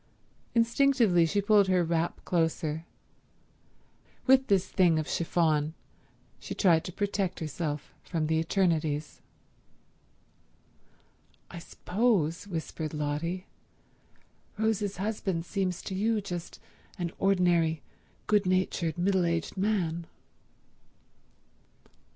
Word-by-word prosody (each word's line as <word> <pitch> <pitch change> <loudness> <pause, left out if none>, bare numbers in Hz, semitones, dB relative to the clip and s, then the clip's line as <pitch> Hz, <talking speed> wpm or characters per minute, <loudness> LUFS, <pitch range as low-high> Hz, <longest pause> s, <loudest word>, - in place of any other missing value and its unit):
Instinctively 230 -7 +4
she 200 +4 0
pulled 205 -1 +5
her 185 -2 +3
wrap 165 0 -1
closer. 160 -2 -1 1.4
With 265 0 +5
this 195 -2 +2
thing 175 -4 +3
of 155 - -1
chiffon 160 -2 +1 0.6
she - - -6
tried 170 -5 +4
to - - -5
protect 200 -1 -2
herself 150 -2 -4
from 160 -3 -2
the 160 +1 +1
eternities. 160 -4 0 2.3
"I 170 - -7
suppose," 180 -2 0
whispered 160 -3 -4
Lotty, 155 +5 -2 1.1
"Rose's 210 -3 0
husband 190 -4 -2
seems 185 -2 -2
to 195 - -5
you 215 +3 +1
just 175 -4 -6 0.4
an 175 -2 -3
ordinary, 175 -5 +2 0.4
good 210 -3 +2
natured, 185 -3 0
middle 185 +1 +2
aged 170 -1 -2
man." 180 -5 -1
175 Hz, 95 wpm, -29 LUFS, 160-200 Hz, 2.3 s, pulled